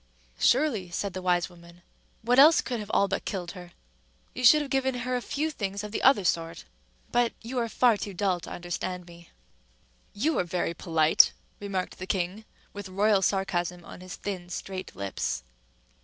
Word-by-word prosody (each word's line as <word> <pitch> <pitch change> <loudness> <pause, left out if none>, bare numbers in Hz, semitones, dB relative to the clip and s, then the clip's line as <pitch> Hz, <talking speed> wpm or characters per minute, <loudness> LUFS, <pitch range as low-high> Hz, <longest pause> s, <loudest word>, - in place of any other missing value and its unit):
"Surely," 240 -9 +2
said 195 +2 -3
the 185 - -5
wise 175 -2 +2
woman: 170 0 -17 0.4
"what 245 +3 +4
else 310 +4 +8
could 245 -3 -2
have 210 -1 -7
all 200 - +3
but 195 +1 -2
killed 180 -3 -4
her? 180 -2 -11 0.6
You - - -5
should 300 +5 +7
have 275 - -9
given 265 -1 +1
her 255 0 -1
a 250 - -1
few 305 +5 -2
things 200 -6 -4
of 210 - -6
the - - -2
other 265 -7 +5
sort. 165 -1 -1 0.5
But 240 -1 +2
you 245 +2 -3
are 230 -1 -1
far 235 -1 +3
too 200 -1 -6
dull 185 -1 +1
to - - -10
understand 175 +1 -4
me." 170 0 -15 0.9
"You 300 +10 +1
are - - +2
very 175 -1 -2
polite," 160 -2 +4 0.3
remarked 195 -2 -4
the 185 - -6
king, 190 +3 -2 0.3
with 205 -1 -7
royal 200 +1 +3
sarcasm 180 -3 -1
on - - -11
his 185 0 -8
thin, 185 -3 -6
straight 185 +1 -6
lips. 95 -10 -3
195 Hz, 185 wpm, -27 LUFS, 175-230 Hz, 0.9 s, else